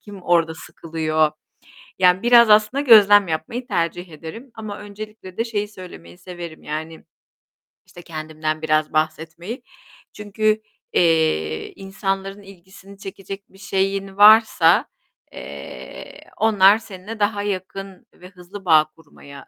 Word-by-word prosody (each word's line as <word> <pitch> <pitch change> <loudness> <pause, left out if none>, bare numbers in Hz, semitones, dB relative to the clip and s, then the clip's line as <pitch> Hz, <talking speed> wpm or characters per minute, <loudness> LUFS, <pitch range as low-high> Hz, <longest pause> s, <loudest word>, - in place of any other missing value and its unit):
kim 200 -3 -12
orada 165 -2 +1
sıkılıyor? 155 -1 -2 0.7
Yani, 180 0 +4
biraz 235 -1 +6
aslında 215 +6 +4
gözlem 205 -7 +6
yapmayı 165 +11 -4
tercih 175 -4 -2
ederim. 165 - -10
Ama 215 -2 -7
öncelikle 205 -2 -10
de 230 - 0
şeyi 210 -3 -3
söylemeyi 175 - -13
severim; 175 -3 -9
yani, 160 +2 -6 0.8
işte, 175 - -14
kendimden 155 -1 -5
biraz 155 -1 0
bahsetmeyi. 160 +9 -3 0.5
Çünkü, 215 +1 -1 0.3
eee, 160 - +1
insanların 195 0 -4
ilgisini 195 0 -16
çekecek 195 0 -9
bir 190 - -20
şeyin 195 0 -2
varsa, 220 +2 +6 0.5
eee, - - -10 0.2
onlar 210 -2 +5
seninle 210 0 -10
daha 205 0 0
yakın 195 -1 -6
ve 180 - -14
hızlı 185 +2 -12
bağ 155 -3 +5
kurmaya 140 -3 -15
190 Hz, 115 wpm, -21 LUFS, 160-205 Hz, 0.8 s, biraz